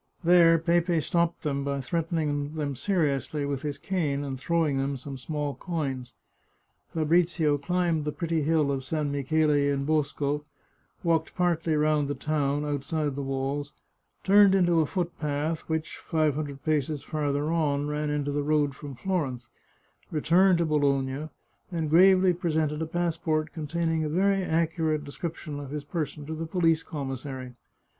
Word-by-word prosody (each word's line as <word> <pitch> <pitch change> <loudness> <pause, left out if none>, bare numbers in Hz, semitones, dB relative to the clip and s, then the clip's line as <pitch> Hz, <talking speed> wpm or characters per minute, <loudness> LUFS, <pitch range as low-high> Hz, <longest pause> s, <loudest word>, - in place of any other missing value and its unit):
There 170 -1 +6
Pepe 170 +1 +2
stopped 170 +2 0
them 140 -2 -1
by 140 0 -2
threatening 155 0 -2
them 145 -3 -2
seriously 150 -2 0
with 140 -2 -2
his 145 -2 -3
cane 150 -7 -1
and 135 -2 -5
throwing 155 -1 +1
them 135 0 -1
some 135 +2 -7
small 145 +2 -3
coins. 135 -9 -4 0.8
Fabrizio 160 -2 +2
climbed 170 0 0
the 150 - -1
pretty 165 +1 -1
hill 150 -1 +2
of 135 -1 -2
San 150 +1 -2
Michele 150 +2 +1
in 140 -1 +1
Bosco, 150 -1 0 0.6
walked 165 -2 +1
partly 170 -3 +1
round 150 -1 +2
the 145 - -2
town, 145 0 0
outside 145 +1 -1
the 140 - -4
walls, 135 +2 -3 0.5
turned 200 0 +6
into 175 -3 +3
a 155 - +2
foot 175 0 -3
path, 150 +2 -2
which, 160 0 -2
five 155 -2 +1
hundred 145 -2 -5
paces 150 -2 0
farther 145 0 -1
on, 145 -3 +1
ran 150 0 -2
into 145 -1 -1
the 145 +1 0
road 145 -1 +1
from 140 -2 -8
Florence, 130 -8 -2 0.6
returned 175 +4 +4
to 170 - +1
Bologna, 140 -1 0 0.4
and 160 -3 -2
gravely 185 +2 +6
presented 160 -3 -1
a 160 - -2
passport 160 -2 -1
containing 165 0 -1
a 155 - -1
very 195 +4 +2
accurate 160 -3 0
description 150 0 -6
of 140 -2 -7
his 150 0 -4
per 155 +2 -2
son 150 -2 -10
to 160 - -5
the 160 +1 -4
police 165 -2 +2
commissary. 135 -3 -6
155 Hz, 155 wpm, -27 LUFS, 145-165 Hz, 0.8 s, There